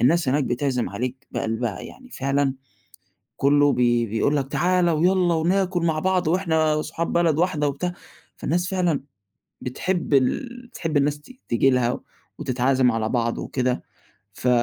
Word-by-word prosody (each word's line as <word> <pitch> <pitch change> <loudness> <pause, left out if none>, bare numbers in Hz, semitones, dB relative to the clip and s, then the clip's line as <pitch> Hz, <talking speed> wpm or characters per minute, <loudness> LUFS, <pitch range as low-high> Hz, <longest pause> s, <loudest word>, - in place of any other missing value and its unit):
الناس 150 +3 +3
هناك 140 +1 +2
بتعزم 125 -1 -1
عليك 130 +3 -5
بقلبها، 115 -1 -2
يعني 255 -1 -12
فعلًا 140 0 0 0.8
كله 145 0 +4
بي 120 -1 +2
بيقول 115 +7 0
لك 135 - -1
تعال 180 -1 +2
ويلّا 175 +2 +3
وناكل 180 +1 +1
مع 160 -2 +1
بعض 185 0 +1
وإحنا 160 -3 +2
صُحاب 165 +2 -3
بلد 170 -3 +2
واحدة 165 -4 +1
وبتاع، 175 +6 -2 0.4
فالناس 175 +4 -1
فعلًا 175 -7 0 0.6
بتحب 170 +6 -2
ال 245 - 0
بتحب 165 -9 -2
الناس 145 +1 +1
ت 150 - -15 0.2
تيجي 120 +3 +3
لها 125 -1 +1 0.4
وتتعازِم 130 0 +2
على 110 -1 -1
بعض 115 -1 0
وكده، 125 -1 -1 0.5
ف 125 - -4
145 Hz, 145 wpm, -23 LUFS, 125-175 Hz, 0.8 s, كله